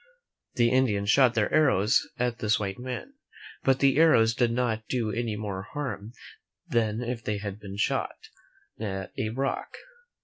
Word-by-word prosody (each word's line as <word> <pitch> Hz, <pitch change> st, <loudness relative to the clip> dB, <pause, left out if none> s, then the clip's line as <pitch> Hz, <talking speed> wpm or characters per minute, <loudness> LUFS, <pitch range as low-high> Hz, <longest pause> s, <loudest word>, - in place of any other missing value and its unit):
The 120 Hz, -1 st, +3 dB
Indians 105 Hz, -6 st, +2 dB
shot 130 Hz, -2 st, +5 dB
their 110 Hz, -2 st, +1 dB
arrows 130 Hz, -9 st, +3 dB
at 125 Hz, -1 st, -1 dB
this 105 Hz, 0 st, +2 dB
white 100 Hz, -1 st, -4 dB
man, 130 Hz, -, -6 dB, 0.5 s
but 135 Hz, -1 st, +3 dB
the 135 Hz, 0 st, +3 dB
arrows 115 Hz, -9 st, +5 dB
did 120 Hz, 0 st, +1 dB
not 115 Hz, -2 st, -1 dB
do 115 Hz, -4 st, -1 dB
any 115 Hz, -2 st, -2 dB
more 105 Hz, -3 st, -4 dB
harm 130 Hz, -6 st, -5 dB, 0.5 s
than 115 Hz, 0 st, 0 dB
if 120 Hz, -1 st, -4 dB
they 105 Hz, -1 st, -2 dB
had 100 Hz, 0 st, -6 dB
been 100 Hz, -1 st, -8 dB
shot -, -, 0 dB, 0.6 s
at 95 Hz, -3 st, -4 dB
a 110 Hz, -, -2 dB
rock. 135 Hz, +4 st, -3 dB
115 Hz, 160 wpm, -27 LUFS, 105-125 Hz, 0.6 s, shot